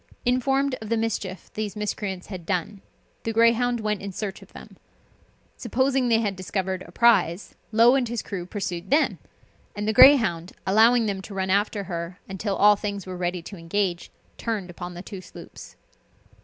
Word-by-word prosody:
Informed 270 +2 +1
of 215 - -7
the 230 - +1
mischief 200 -5 -3
these 210 -2 -4
miscreants 205 -3 -4
had 185 -4 -8
done, 190 +3 -3 0.4
the 225 - -2
Greyhound 230 +1 +3
went 210 -1 -1
in 200 0 -5
search 195 +1 -5
of - - -16
them. - - -13 0.8
Supposing 260 +1 +1
they 225 -1 +4
had 205 -3 -1
discovered 185 0 -3
a - - -13
prize, 195 -4 +3 0.2
Low 230 +3 +6
and 265 -3 +1
his 235 -1 -3
crew 180 -4 -6
pursued 185 -3 -4
them, 290 +3 +2 0.6
and 205 0 -3
the 220 - +1
Greyhound, 215 - +6
allowing 225 +4 +5
them 200 -2 -2
to 200 +1 -10
run 190 -1 -1
after 205 +1 +1
her 170 0 -6
until 195 +1 -3
all 210 +1 +6
things 200 -2 -5
were 185 -1 -6
ready 175 -1 -3
to 195 - -9
engage, 175 +1 -2 0.3
turned 210 -6 -3
upon 175 0 -8
the 175 - -8
two 195 -3 -8
sloops. - - -12
205 Hz, 175 wpm, -25 LUFS, 185-230 Hz, 0.8 s, Low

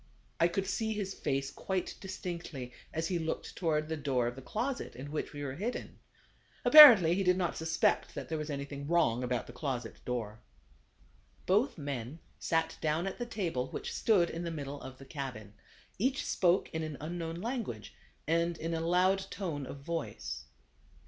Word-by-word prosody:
I 170 - +6
could 190 +3 -1
see 220 +3 -1
his 200 -2 -3
face 135 -4 -2
quite 190 -2 -2
distinctly 170 -9 -5 0.2
as 160 +1 -2
he 180 -2 0
looked 160 -1 -3
toward 155 -3 0
the 160 - -2
door 135 -5 0
of 120 +1 -2
the 135 - -9
closet 245 - -3
in 135 +4 -7
which 155 - -3
we 145 -1 -6
were 135 -2 -3
hidden. 215 - -4 0.7
Apparently 235 - +11
he 195 - +1
did 180 0 +4
not 180 -2 0
suspect 160 0 +1
that - - -5
there 160 -1 -2
was 150 0 -4
anything 140 0 -5
wrong 150 -8 +2
about 125 -1 -1
the 120 - -11
closet 125 -3 -4
door. 115 -3 -3 1.1
Both 220 +7 +2
men 140 -2 -4 0.2
sat 165 -1 0
down 155 +3 +1
at 195 - -4
the 240 - -3
table, 170 - -2
which - - -5
stood 190 -6 +3
in 165 +1 -4
the 170 - -2
middle 145 -3 -5
of 130 0 -9
the 135 - -12
cabin. 130 -8 -6 0.5
Each 260 +5 +1
spoke 180 0 +2
in 160 - -1
an 155 -3 -4
unknown 165 +1 -4
language, 200 - -4 0.3
and 170 +1 +1
in 165 +1 -3
a 165 - -1
loud 185 +3 +2
tone 150 -9 -4
of 140 - -8
voice. 160 - -4
160 Hz, 180 wpm, -32 LUFS, 140-185 Hz, 1.1 s, Apparently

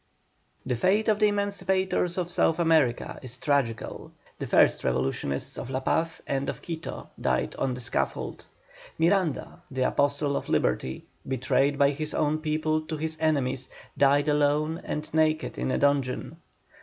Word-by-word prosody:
The 125 - 0
fate 190 - +2
of 210 -1 +2
the 210 - +5
emancipators 190 -3 0
of 175 -1 -2
South 165 -2 +2
America 160 -8 +2
is 130 -1 -6
tragical. 140 -8 -1 0.3
The - - -3
first - - +4
revolutionists 65 +1 -1
of - - -6
La 130 0 -1
Paz 165 +4 -1
and 135 0 -1
of - - -6
Quito 165 -1 -6
died 65 0 0
on 130 -2 -1
the 125 - -7
scaffold. 115 - -2 0.5
Miranda, 170 -2 +1
the 130 -1 -1
apostle 140 +1 +1
of - - -3
liberty, 65 +1 0 0.2
betrayed 135 +2 +1
by 140 0 +4
his 155 +2 -4
own 155 0 +1
people 155 0 0
to 160 - -3
his 160 +1 -2
enemies, 140 -5 0 0.3
died 140 +1 +4
alone 150 +2 +2
and 150 0 -5
naked 155 0 +1
in - - -1
a - - +1
dungeon. 140 -3 0
150 Hz, 155 wpm, -27 LUFS, 130-160 Hz, 0.5 s, the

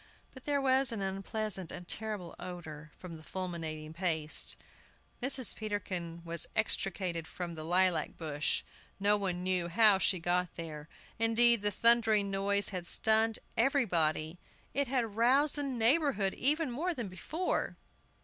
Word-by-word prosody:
But 260 - -14
there 285 -1 +1
was 265 -1 +3
an 215 -4 -3
unpleasant 195 -1 -4
and 175 - -9
terrible 210 -6 -4
odor 160 -4 -9
from 170 -3 -9
the 155 - -15
"fulminating 160 -4 -5
paste." 160 -3 0 0.7
Mrs. 260 -1 +2
Peterkin 185 -6 -4
was 170 0 -1
extricated 185 -5 -1
from 175 -2 -6
the 155 -1 -7
lilac 180 +1 +1
bush. 155 -2 -2 0.4
No 205 +1 +3
one 185 -3 -3
knew 180 -2 0
how 200 +2 +4
she 190 - +2
got 175 +1 0
there. 155 -2 -8 0.3
Indeed, 230 0 +5
the 205 - +2
thundering 220 -1 +4
noise 200 +1 +2
had 180 -3 -5
stunned 220 0 +2 0.2
everybody. 175 - +1 0.3
It 280 0 0
had 235 -5 -1
roused 265 +6 +3
the 290 - -2
neighborhood 255 -5 +1
even 295 +1 +3
more 335 +8 -2
than 235 -6 -4
before. 310 - -3
195 Hz, 140 wpm, -31 LUFS, 170-235 Hz, 0.7 s, Indeed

